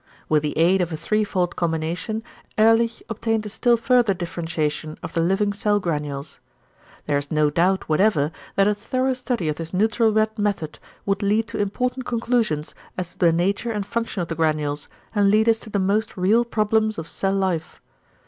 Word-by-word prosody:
With 155 -1 +3
the 150 0 -3
aid 180 +4 +4
of 175 -1 -1
a 160 - -3
threefold 200 -3 0
combination 170 +6 -2 0.3
Ehrlich 225 +1 +3
obtained 225 -1 -1
a - - -4
still 235 +3 +2
further 230 -3 +3
differentiation 160 -3 -3
of 165 - -6
the 165 - +1
living 195 +4 +1
cell 205 0 +1
granules. 150 -5 -4 0.7
There 145 -1 +1
is 145 - -7
no 150 -1 +2
doubt 185 +5 +1
whatever 155 -3 +2 0.2
that 195 0 +4
a 210 - +3
thorough 255 +5 -1
study 250 -8 -2
of 150 - -1
this 165 +2 -6
neutral 220 +3 +3
red 215 0 +1
method 200 -7 -2 0.3
would 195 +1 0
lead 210 +2 +1
to 230 - -5
important 250 +5 -1
conclusions 230 -10 0 0.2
as 180 -2 -4
to - - -22
the 170 -2 +5
nature 195 +7 0
and 210 -3 -2
function 230 -4 -2
of - - -6
the 165 - -3
granules, 150 -2 -1 0.2
and 205 -2 +3
lead 215 +2 +4
us 225 -1 +4
to 225 - -11
the 205 - -1
most 200 +3 0
real 215 +6 +3
problems 220 -1 +1
of 160 0 -5
cell 195 +2 -1
life. 185 -5 -1
195 Hz, 185 wpm, -23 LUFS, 165-220 Hz, 0.7 s, the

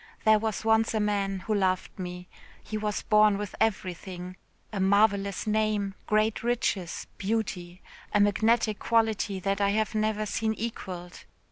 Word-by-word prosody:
There 215 -1 +6
was 220 0 -3
once 220 0 +3
a - - +2
man 200 -2 0
who 220 - -2
loved 190 -1 0
me. 180 0 -6 0.4
He 215 - -6
was 210 -1 -2
born 210 -1 +4
with 205 -1 -5
everything 185 -3 -2 0.4
a 200 - -2
marvellous 200 0 +2
name, 215 -2 0
great 215 +1 +2
riches, 225 -7 -1
beauty, 190 -4 -3 0.3
a 210 - +3
magnetic 215 +1 +2
quality 220 -4 +1
that 195 +1 -1
I 200 - +3
have 215 +1 0
never 215 0 0
seen 220 +1 -1
equalled. 185 -6 -6
210 Hz, 145 wpm, -28 LUFS, 195-220 Hz, 0.4 s, There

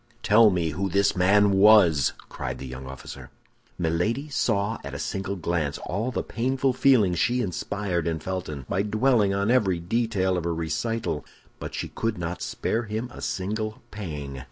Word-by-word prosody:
"Tell 110 +1 +6
me 85 -4 0
who 95 +6 -2
this 100 +2 +2
man 100 +2 +4
was!" 95 - +6
cried - - -5
the 65 - -7
young 65 +1 -8
officer. 65 0 -9 0.5
Milady 90 - -1
saw 110 -5 0
at 70 0 -6
a - - -3
single 95 +6 -3
glance 85 -5 -1
all 110 +5 -3
the 130 - -2
painful 130 +2 0
feelings 110 -11 +3
she 125 +2 +2
inspired 90 -3 -2
in 80 -1 0
Felton 80 -6 -5
by 100 -1 0
dwelling 110 0 +2
on 100 +3 +1
every 95 -9 +2
detail 95 -1 0
of - - -6
her 85 0 -1
recital; 85 0 -2 0.4
but - - -6
she - - -4
would 115 -1 0
not 85 0 -4
spare 115 +1 -2
him 110 +3 -4
a - - -10
single 110 +3 -3
pang. 75 -9 -6
100 Hz, 170 wpm, -25 LUFS, 85-110 Hz, 0.5 s, Tell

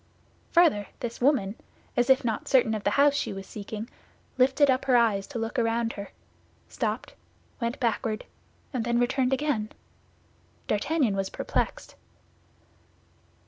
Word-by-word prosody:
Further, 310 - +4
this 240 0 -5
woman, 245 -8 +2 0.4
as 245 +1 +2
if 265 0 +5
not 225 -2 -2
certain 245 -4 +4
of 215 -2 -3
the - - +2
house 285 0 +6
she 285 - -1
was 195 -1 -7
seeking, 215 +2 -7 0.5
lifted 265 +3 +4
up 260 -1 +2
her 255 -2 +5
eyes 215 -4 +2
to 275 - -6
look 225 +4 -2
around 230 0 0
her, 200 0 -8 0.6
stopped, - - -3 0.5
went 235 -1 -2
backward, 220 -2 -1 0.5
and 250 -3 -1
then 235 0 +1
returned 255 +1 +1
again. 265 -6 0 1.0
D'Artagnan 235 +1 +1
was 195 -1 -1
perplexed. - - -2
235 Hz, 140 wpm, -27 LUFS, 215-265 Hz, 1.0 s, house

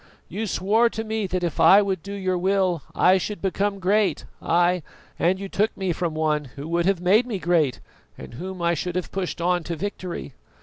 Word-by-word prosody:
You 220 +1 -3
swore 215 +6 +2
to 220 -1 -4
me 220 -2 -2
that 185 -1 -2
if 170 - -2
I 200 +2 +7
would 190 -3 -2
do 200 +3 -7
your 185 -2 -1
will 185 -2 +1
I 185 +1 +5
should 205 +3 -4
become 200 +1 -1
great, 195 -2 +1 0.2
ay! 175 +1 +2 0.4
and 185 +3 +2
you 195 - -5
took 210 +3 0
me 190 -3 -1
from 165 -1 -3
one 155 -1 0
who 145 +2 -7
would 170 +1 +1
have 195 -3 +2
made 210 +7 +4
me 220 -5 -2
great 165 -7 +1 0.4
and - - -10
whom 185 +6 -6
I 170 0 +3
should 175 +2 -3
have 180 - -3
pushed 185 -2 -3
on 175 0 +1
to 170 - -3
victory. 180 -5 -5
185 Hz, 210 wpm, -24 LUFS, 170-200 Hz, 0.4 s, I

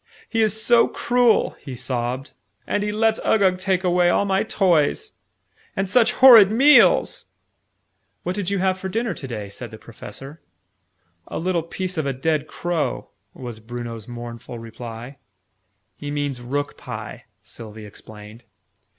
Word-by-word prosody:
"He 225 - 0
is 215 0 +2
so 230 +1 +4
cruel!" 245 -2 +2
he 135 -4 -8
sobbed. 125 +2 -3 0.3
"And 205 - -1
he 210 0 -1
lets 220 +1 +1
Uggug 190 -4 +2
take 190 -1 0
away 180 -1 +3
all 200 - +2
my 195 0 +1
toys! 195 - +1 0.6
And 195 0 -1
such 245 +4 +3
horrid 235 -7 +8
meals!" 290 - +4 1.0
"What 180 - -2
did 195 -2 -3
you 200 - 0
have 190 0 0
for 190 - -5
dinner 225 +1 -1
to 140 - -8
day?" 105 -5 -5
said 100 - -9
the - - -11
Professor. 140 +4 -11 0.9
"A - - -5
little 175 0 0
piece 180 +1 -5
of 145 - -1
a 135 - -1
dead 155 +3 -1
crow," 175 -3 -3 0.2
was 120 -4 -8
Bruno's 115 -1 -7
mournful 120 0 -8
reply. 115 +3 -9 0.8
"He 145 - -7
means 145 -3 -3
rook 145 +4 -3
pie," - - -8 0.2
Sylvie 110 -2 -11
explained. 105 +2 -13
165 Hz, 150 wpm, -22 LUFS, 120-200 Hz, 1.0 s, horrid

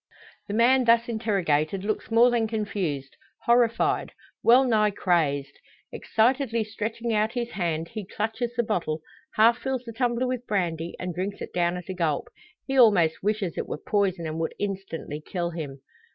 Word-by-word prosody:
The 205 - -3
man 250 +3 +4
thus 235 0 +4
interrogated 195 -7 0
looks 215 +1 -2
more 235 +2 +5
than 230 -2 +1
confused 195 -11 -3 0.3
horrified, 235 -1 +2 0.3
well 245 +3 +6
nigh 215 -4 +3
crazed. 150 -8 0 0.3
Excitedly 235 0 +1
stretching 225 +2 -3
out 215 +1 +1
his 240 -2 -3
hand, 165 -3 -2
he 215 -2 -6
clutches 225 +4 -2
the 240 - +3
bottle, 165 -8 -2 0.3
half 230 +2 +5
fills 265 -2 -2
the 230 - -7
tumbler 245 +1 0
with 250 -1 -3
brandy, 170 -4 -1
and 180 -1 -4
drinks 190 +4 -4
it - - -7
down 175 0 +1
at 180 - -9
a 190 - -4
gulp. 165 -5 -1 0.4
He 270 -1 +1
almost 190 -9 +5
wishes 205 -4 -1
it - - -3
were - - -4
poison, 190 -1 0
and 155 +1 -4
would 165 - -2
instantly 190 -6 -4
kill 175 0 -3
him! 145 -5 -6
210 Hz, 165 wpm, -26 LUFS, 170-230 Hz, 0.4 s, well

